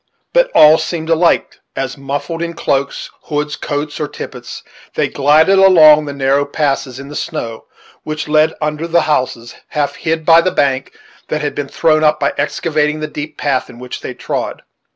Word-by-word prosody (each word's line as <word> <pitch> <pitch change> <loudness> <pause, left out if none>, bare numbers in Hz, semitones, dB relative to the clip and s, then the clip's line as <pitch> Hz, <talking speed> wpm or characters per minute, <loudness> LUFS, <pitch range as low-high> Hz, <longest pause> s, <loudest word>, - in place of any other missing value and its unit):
But - - +3
all 155 +1 +7
seemed 160 0 -3
alike, 170 +1 +2 0.2
as 135 -1 -3
muffled 145 +4 -4
in 170 0 -4
cloaks, 140 -4 -2
hoods, 150 0 -2
coats, 145 +1 -4
or 150 - -2
tippets, - - -9 0.3
they - - +1
glided 155 +7 +4
along 155 -6 +7
the 145 - -5
narrow 140 0 +1
passages 140 -3 -2
in 140 0 -9
the 150 - -9
snow 120 -10 -5 0.4
which 155 0 -5
led 155 +1 +3
under 150 +2 -2
the 170 0 +3
houses, 125 -5 -1
half 145 -2 -2
hid 160 -1 -2
by 165 +1 +7
the 185 - +1
bank 135 -5 0 0.4
that 155 - -2
had 145 -1 -2
been 145 -1 -4
thrown 155 +2 +2
up 150 0 +2
in - - +2
excavating 155 -2 0
the 155 - -3
deep 150 0 -7
path 135 -3 -1
in - - -13
which 125 0 -8
they - - -6
trod. - - -4
150 Hz, 180 wpm, -16 LUFS, 140-160 Hz, 0.4 s, all